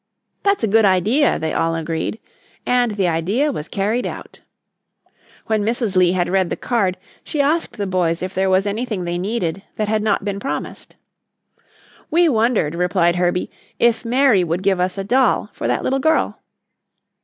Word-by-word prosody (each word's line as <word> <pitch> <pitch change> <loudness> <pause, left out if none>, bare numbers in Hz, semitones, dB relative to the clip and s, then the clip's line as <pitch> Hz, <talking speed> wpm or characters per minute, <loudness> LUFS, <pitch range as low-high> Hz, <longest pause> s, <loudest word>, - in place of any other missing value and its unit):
"That's 400 - +1
a - - +3
good 220 +2 +4
idea," 210 - +3
they 160 - -3
all 165 0 0
agreed, 165 +6 -3 0.5
and 245 -3 +2
the 195 -3 0
idea 195 - 0
was 160 - -5
carried 215 +5 -1
out. - - -9 1.0
When 220 -1 0
Mrs. 225 -1 -1
Lee 180 -1 +4
had 175 -1 0
read 190 -1 +1
the - - -2
card 200 -7 -1 0.3
she 300 - -5
asked 295 0 0
the 205 - -2
boys 180 -3 0
if 185 0 -4
there 190 0 +1
was 190 +1 +3
anything 210 -1 -2
they 175 0 -3
needed 195 -3 -2
that 215 -1 -2
had 215 0 +1
not 210 -1 0
been 200 -1 -2
promised. 270 - -6 1.1
"We 345 +1 +4
wondered," 225 - +1
replied 175 0 +1
Herbie, 180 0 0 0.3
"if 235 0 +2
Mary 245 -4 +3
would 175 +2 -2
give 195 -2 +2
us 180 +2 -1
a 195 - -2
doll 255 +6 +1
for - - -4
that - - 0
little 270 +1 0
girl?" 315 +3 +1
200 Hz, 175 wpm, -20 LUFS, 180-235 Hz, 1.1 s, good